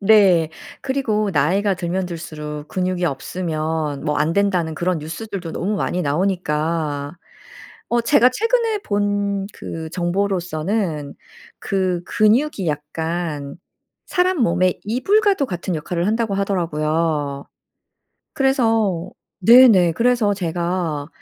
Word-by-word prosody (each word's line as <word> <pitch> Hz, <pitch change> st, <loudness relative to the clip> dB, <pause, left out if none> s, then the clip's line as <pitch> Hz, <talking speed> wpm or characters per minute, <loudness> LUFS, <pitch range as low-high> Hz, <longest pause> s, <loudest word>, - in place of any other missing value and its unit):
네. 195 Hz, -6 st, +5 dB, 0.3 s
그리고 225 Hz, -7 st, 0 dB
"나이가 190 Hz, +7 st, +2 dB
들면 180 Hz, +1 st, -2 dB
들수록 150 Hz, -3 st, -7 dB
근육이 185 Hz, -1 st, -1 dB
없으면 155 Hz, -1 st, -2 dB
뭐 150 Hz, -1 st, 0 dB
안된다."는 170 Hz, 0 st, +1 dB
그런 175 Hz, 0 st, -1 dB
뉴스들도 170 Hz, +2 st, -6 dB
너무 205 Hz, +3 st, -2 dB
많이 180 Hz, -2 st, -1 dB
나오니까. 155 Hz, -2 st, -1 dB, 0.7 s
어 240 Hz, -, +2 dB
제가 250 Hz, 0 st, +5 dB
최근에 455 Hz, -, +1 dB
본 205 Hz, -, -1 dB
그 160 Hz, -1 st, -6 dB
정보로서는 175 Hz, -3 st, -1 dB, 0.5 s
그 185 Hz, -3 st, -1 dB
"근육이 220 Hz, 0 st, +2 dB
약간 150 Hz, 0 st, -3 dB, 0.5 s
사람 365 Hz, 0 st, +1 dB
몸에 180 Hz, -1 st, +2 dB
이불과도 380 Hz, -, +2 dB
같은 175 Hz, -2 st, -3 dB
역할을 170 Hz, +3 st, -2 dB
한다."고 220 Hz, -1 st, 0 dB
하더라고요. 155 Hz, -6 st, -1 dB, 0.9 s
그래서 225 Hz, -, +1 dB, 0.3 s
네네 205 Hz, -5 st, +7 dB
그래서 235 Hz, -1 st, +2 dB
제가 170 Hz, -4 st, -2 dB
180 Hz, 245 characters per minute, -20 LUFS, 160-210 Hz, 0.9 s, 네네